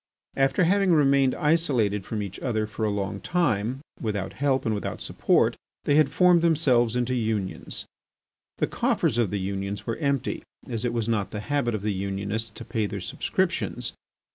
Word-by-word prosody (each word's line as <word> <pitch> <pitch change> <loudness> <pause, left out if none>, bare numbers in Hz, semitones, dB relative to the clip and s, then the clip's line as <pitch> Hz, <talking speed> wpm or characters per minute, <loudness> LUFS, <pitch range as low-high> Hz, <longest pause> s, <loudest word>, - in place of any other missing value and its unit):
After 135 +5 +3
having 195 +1 +4
remained 140 -3 +4
isolated 130 - +2
from 105 -2 -2
each 100 - -7
other 110 -4 0
for 110 +1 -3
a - - +1
long 100 -1 -2
time, 130 - 0 0.2
without 100 -4 -3
help 135 -1 +1
and 110 - +1
without 105 - -3
support, - - +2 0.3
they - - +2
had 150 -2 +5
formed 180 +2 +5
themselves 130 -8 +3
into 125 +1 0
unions. 110 -6 -2 0.7
The - - +2
coffers 120 - +1
of 115 -5 +2
the 100 - -2
unions 100 +1 -3
were 115 - -2
empty, 140 -4 -1 0.3
as 115 -1 -3
it 120 - 0
was 115 -2 -1
not 110 -4 0
the 105 - -5
habit 120 -1 0
of 105 - -4
the 105 -1 0
unionists 100 +3 -3
to 105 - -10
pay 110 -2 -1
their 100 - -5
subscriptions. 90 - -1
115 Hz, 175 wpm, -26 LUFS, 105-140 Hz, 0.7 s, had